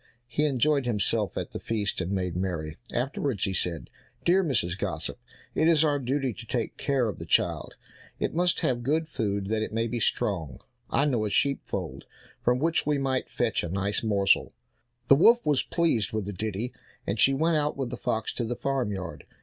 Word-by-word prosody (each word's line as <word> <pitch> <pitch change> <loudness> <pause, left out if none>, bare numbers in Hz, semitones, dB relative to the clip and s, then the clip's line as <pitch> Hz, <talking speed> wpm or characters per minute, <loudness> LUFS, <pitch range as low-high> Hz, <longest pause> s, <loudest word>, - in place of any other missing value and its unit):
He 145 +5 0
enjoyed 140 -1 +2
himself 105 -5 0
at - - -3
the - - -5
feast, 105 -4 -1
and 90 +1 -3
made 90 -3 -1
merry; 85 -4 -2 0.2
afterwards 130 -4 -1
he 95 - 0
said, 85 -8 -2 0.3
"Dear 185 +3 +4
Mrs. 100 - +1
Gossip, - - -3 0.3
it 155 - +2
is 160 -2 +5
our 145 -2 +2
duty 135 0 -1
to 115 - -10
take 120 -1 -2
care 135 -4 +1
of 105 - -4
the - - -6
child, - - +1 0.4
it - - -1
must 175 +2 +2
have 120 -2 +1
good 155 +6 0
food 100 -8 -2
that 110 0 0
it 110 - -3
may 115 +1 0
be 120 +1 -2
strong. 80 - -1 0.3
I 140 - +2
know 125 -7 +1
a 105 - -1
sheep 140 +6 +1
fold - - -5 0.4
from 125 +1 +3
which 165 +5 +2
we 150 0 +1
might 135 -1 -1
fetch 115 -4 0
a 85 - -3
nice 100 +3 0
morsel." 100 -3 +2 0.5
The - - +8
wolf 235 - +5
was 145 -3 +3
pleased 155 - 0
with 110 -3 -1
the 105 - -4
ditty, 110 +4 -3 0.3
and 100 +2 -2
she 135 +4 +5
went 160 +3 +2
out 150 -1 0
with 135 -3 -3
the - - -2
fox 110 - -2
to 120 - -2
the 120 +1 -2
farm 135 -5 -1
yard. 95 -4 -5
120 Hz, 205 wpm, -27 LUFS, 100-140 Hz, 0.5 s, The